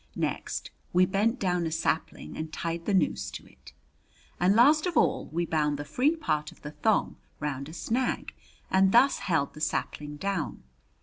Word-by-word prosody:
Next - - -3 0.2
we 180 +1 +5
bent 210 +7 +1
down 180 -3 0
a - - -4
sapling 160 0 -2
and 160 0 -5
tied 165 +1 -4
the 205 - 0
noose 65 - +1
to - - -9
it, - - -17 0.7
and 185 +3 +4
last 300 +8 +5
of 345 - -1
all - - +2
we 170 +2 -1
bound 150 -3 0
the 145 - -5
free 280 - +2
part 150 - -1
of - - -20
the 150 - -6
thong 220 +7 +1 0.2
round 140 -1 -3
a - - -10
snag 230 +9 -1 0.4
and 190 0 +4
thus 265 +4 +5
held 160 -7 0
the 150 - -11
sapling 150 -1 -2
down. 195 - -3
175 Hz, 180 wpm, -28 LUFS, 150-215 Hz, 0.7 s, we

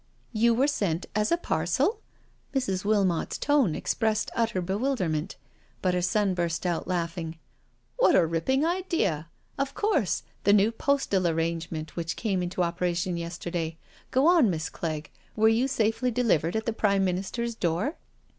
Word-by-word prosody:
"You 230 +1 +3
were 260 +4 +3
sent 195 - 0
as 210 0 +1
a 340 - +4
parcel?*' 345 - 0 0.6
Mrs. 200 -8 0
Wilmot's 200 -5 +1
tone 275 - +2
expressed 220 -2 0
utter 230 -5 +1
bewilderment, 190 - -1 0.4
but 185 -1 +1
her 180 - +1
son 195 +2 +1
burst 170 -1 -2
out 175 -2 -1
laughing: 165 -2 -3 0.6
"What - - +5
a 175 - +5
ripping 165 - +1
ideal 335 - 0 0.3
Of 275 0 -1
course, 410 - +1 0.2
the 200 - +5
new 210 +2 +4
postal 230 -7 +1
arrangement 165 -1 -2
which 170 -1 -3
came 195 -5 -1
into 180 0 -1
operation 175 +1 -1
yesterday 170 -1 -4 0.2
— - - -27
go 260 +2 +2
on, 335 - +6
Miss 160 -3 -2
Clegg, 155 -2 -4 0.2
were 220 +1 +5
you 230 +4 +2
safely 225 -1 +1
delivered 215 -9 +1
at 220 0 -1
the 230 - 0
Prime 200 -3 +2
Minister's 195 +6 -2
door?" 190 - -1
195 Hz, 155 wpm, -27 LUFS, 170-235 Hz, 0.6 s, on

